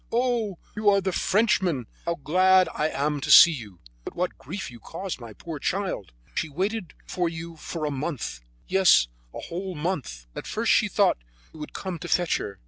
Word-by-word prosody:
"Oh! 235 -5 0 0.2
you 210 -1 +3
are 200 -1 +5
the 190 -1 -1
Frenchman 190 - +2 0.2
how 170 - 0
glad 185 +5 +4
I 155 - 0
am 145 0 -1
to 155 - -4
see 170 +3 +10
you! 105 - -8 0.2
But - - -8
what 180 +1 -1
grief 190 -9 -6
you 120 - -12
caused 180 - -6
the 115 -3 -10
poor 160 -3 -7
child! 185 - -2 0.2
She 160 - -2
waited 190 +4 -3
for 175 -2 -1
you 165 0 -7 0.3
a 150 - -1
month; 140 - -4 0.3
yes, 185 - +5 0.2
a - - -7
whole 185 +2 -5
month. 150 - -3
At - - -6
first - - 0
she - - +4
thought - - +2 0.3
you 160 - -12
would 150 - -7
come 185 -3 -5
to 175 - -6
fetch 175 -1 +2
her. 100 - -6
170 Hz, 190 wpm, -26 LUFS, 145-190 Hz, 0.3 s, see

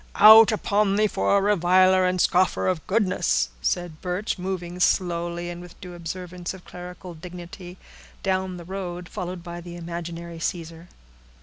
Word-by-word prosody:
"Out 220 +1 +9
upon 205 -1 +1
thee 215 +1 +3
for 200 -1 +2
a - - +2
reviler 185 -1 +4
and 180 0 0
scoffer 180 +1 +2
of 180 -5 -1
goodness!" 190 -2 +1
said 175 -3 -2
Birch, 185 +3 -3
moving 180 -1 -4
slowly, 175 -1 0
and 175 0 -8
with 175 -1 -12
a - - -28
due 180 -2 -9
observance 175 +1 -6
of 185 - -15
clerical 180 0 -9
dignity, 175 +2 -10 0.5
down 190 -1 -1
the 170 - -10
road, 180 -1 -6
followed 180 -3 -6
by 175 0 -7
the 175 0 -9
imaginary 170 0 -6
Caesar. 165 0 -5
180 Hz, 160 wpm, -24 LUFS, 175-185 Hz, 0.5 s, Out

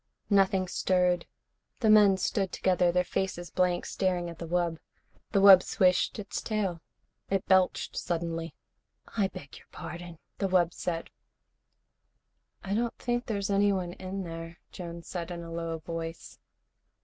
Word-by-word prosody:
Nothing 195 -1 +3
stirred. 180 -1 +1 0.5
The 220 - +3
men 205 -3 +7
stood 195 0 -1
together, 180 -1 +2
their 180 +1 +2
faces 175 -2 -3
blank, 180 -1 +1
staring 180 -3 -1
at 165 - -13
the 170 - -5
wub. 170 -1 0 0.5
The 200 - +3
wub 195 -2 +10
swished 180 -1 +2
its 210 -2 -4
tail. 195 -6 -2 0.5
It 195 -1 0
belched 185 -1 +2
suddenly. 165 -1 -3 0.6
"I 205 -4 +2
beg 145 -7 -11
your - - -22
pardon," 175 -1 -8 0.2
the 195 - +1
wub 175 -2 +3
said. 165 -2 -4 1.5
"I 195 - -3
don't 235 +2 -1
think 240 0 -2
there's 200 -2 -2
anyone 195 -3 +2
in 190 +1 -5
there," 165 0 -7
Jones 170 -2 -8
said 175 -2 -4
in 170 -1 -6
a 165 - -9
low 165 -1 -3
voice. 165 +1 -7
180 Hz, 145 wpm, -29 LUFS, 170-195 Hz, 1.5 s, wub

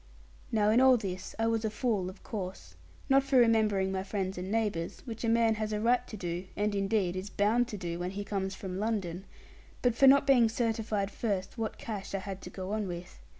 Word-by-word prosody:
Now 210 -1 +3
in 235 +3 +5
all 260 -1 +7
this 185 -4 -5
I 225 - +1
was 225 0 +1
a 220 - +1
fool 215 -4 -1
of 185 - -13
course 185 - -6 0.3
not 270 0 +5
for 270 -1 +1
remembering 215 -5 +3
my 190 0 -1
friends 190 -1 -3
and 180 +1 -5
neighbours, 210 -7 -1
which 230 -2 -6
a 230 - +1
man 230 -1 +4
has 215 0 -1
a 210 - -1
right 245 +3 +2
to 215 - -7
do, 175 0 -4
and 210 0 0
indeed 195 -2 0
is 185 +2 -4
bound 225 +5 +2
to 215 - -6
do, 170 -2 -4
when 180 +1 -2
he 200 +2 -4
comes 195 -1 -3
from 190 -1 -5
London 195 -4 -2 0.6
but 245 -2 +4
for 270 +4 +5
not 275 +1 +7
being 250 -5 +5
certified 220 -3 -1
first 195 -4 -2
what 220 -1 -3
cash 200 -3 -5
I - - +1
had 195 0 -6
to - - -8
go 185 +1 -6
on 215 -2 -1
with. 175 - -7
210 Hz, 225 wpm, -30 LUFS, 190-225 Hz, 0.6 s, all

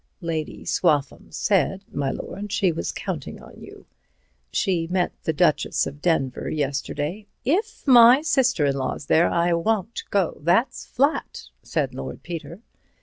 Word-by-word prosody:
"Lady 160 -3 -4
Swaffham 150 -5 0
said, 195 -1 +1
my 140 -1 -1
lord, 200 +8 -6
she 195 -4 +2
was 85 - -3
counting - - -5
on - - -14
you. - - -13 0.7
She 170 -4 0
met 180 0 0
the - - +2
Duchess 155 0 +2
of 145 +1 -8
Denver 140 -7 0
yesterday—" 150 +6 -3 0.2
"If 415 - -1
my 245 +2 +8
sister 255 - +2
in 140 -1 +1
law's 135 +1 -3
there 160 +4 +4
I 170 0 +1
won't 215 +5 -1
go, 195 -4 0
that's 180 - +1
flat," 280 +5 -1
said - - -2
Lord - - -7
Peter. 170 +2 -7
175 Hz, 145 wpm, -23 LUFS, 150-215 Hz, 0.7 s, my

